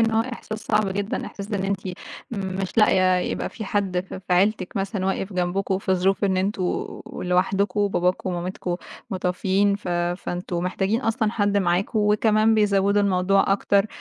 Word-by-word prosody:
إنه 225 0 +2
هو - - +5
إحساس 220 -2 -6
صعب 215 -1 +1
جدًا، 200 +2 -2
إحساس 200 +2 -8
إن 195 -2 -1
أنتِ 195 0 -1 0.5
مش 195 -2 -3
لاقِية 185 -3 +5
يبقى 180 - -2
في 220 - -7
حد 195 -3 0
ف 185 - -9
في 190 -1 -4
عيلتِك 190 0 +1
مثلًا 195 -1 -1
واقِف 195 +1 -2
جنبَكم، 185 +2 0
في 190 -1 0
ظروف 190 +2 +1
إن 190 -2 +2
أنتم 190 +1 0 0.5
لوحدكم 190 +3 0
وباباكم 185 -2 +1
ومامتكُم 175 0 -3 0.3
متوفِّيين. 190 +1 +1
ف 205 - -8
فأنتم 175 0 -2
محتاجين 195 +5 0
أصلًا 225 -2 0
حد 205 -2 +1
معاكم، 190 +3 +1
وكمان 215 +1 +3
بيزوّدوا 200 -1 +3
الموضوع 195 0 +3
أكتر، 200 0 +2
195 Hz, 160 wpm, -24 LUFS, 185-205 Hz, 0.5 s, هو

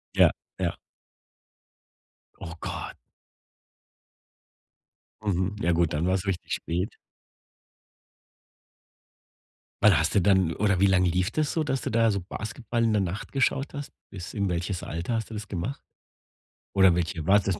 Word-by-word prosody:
Ja, - - +7 0.3
ja. - - -1 1.6
Oh 85 0 -7
Gott. - - -5 2.3
Mhm, 95 0 0
ja 85 - +2
gut, 85 -1 +2
dann 75 +4 0
war's 95 +1 +1
richtig 95 -4 -3
spät. 90 +5 -2 2.9
Wann 100 -7 +7
hast 80 +2 +1
du 100 - +4
dann 95 -3 +3
oder 100 -3 +1
wie 100 - +5
lang 95 -1 +4
lief 90 +3 +1
das 155 +1 0
so, 160 - +1
dass 135 -3 -1
du - - -3
da 115 0 +3
so 100 - -1
Basketball 110 +5 -3
in 115 - +3
der 105 - +3
Nacht 95 +2 -4
geschaut 135 0 +1
hast? 145 0 -6 0.2
Bis 90 0 -8
in 100 -1 0
welches 90 +1 -2
Alter 85 +8 -3
hast 110 0 -3
du - - -6
das 105 -1 -5
gemacht? 100 +9 -4 0.9
Oder 95 -3 +6
welche 85 -1 -2
war's 100 +1 +5
das 95 -3 -1
95 Hz, 145 wpm, -27 LUFS, 90-110 Hz, 2.9 s, Ja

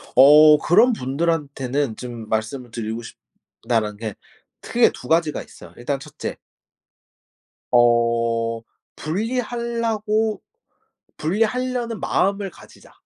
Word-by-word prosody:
어 150 +3 +8
그런 225 +8 +4
분들한테는 140 - -2
좀 120 -3 -8
'말씀을 110 +3 -3
드리고 115 0 -4
싶다.'라는 115 -2 -5
게 110 -2 -5 0.5
크게 - - +3
2 125 - -11
가지가 160 -2 +1
있어요. - - -15
일단 135 +3 -3
1 - - -14
째. - - -4 1.3
어 115 -1 +2 0.3
분리할라고 225 +2 -2 0.8
분리하려는 230 +5 -1
마음을 195 0 0
가지자. - - -17
145 Hz, 220 characters per minute, -22 LUFS, -, 1.3 s, 어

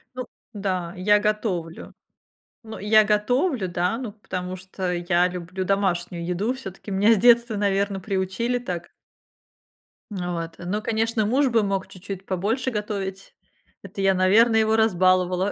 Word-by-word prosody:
Ну 255 - -4 0.3
да, 185 -4 -3
я 205 +3 +3
готовлю. 205 -6 -2 0.7
Ну, 220 0 -8
я 215 +2 +5
готовлю, 220 - +1
да, 180 +4 -1
ну, 245 -4 -5
потому 185 -3 -6
что 185 -1 -4
я 175 0 +2
люблю 180 +1 -5
домашнюю 180 -3 -1
еду. 195 +8 -1
Всё-таки 200 -5 -9
меня 205 +4 +4
с - - +2
детства, 235 +1 +4
наверно, 200 -1 0
приучили 195 +6 -1
так. 175 -7 -6 1.2
Ну 180 -3 -3
вот, 165 -1 -5
ну, 190 +5 -3
конечно, 225 0 0
муж 265 +3 +2
бы 230 -1 +3
мог 195 -2 -1
чуть-чуть 195 0 -8
побольше 220 +8 -1
готовить. 200 -3 -5 0.5
Это 195 - -7
я, 195 -1 +3
наверное, 220 +5 +4
его 220 0 +3
разбаловала. 185 -2 +2
195 Hz, 145 wpm, -24 LUFS, 185-220 Hz, 1.2 s, я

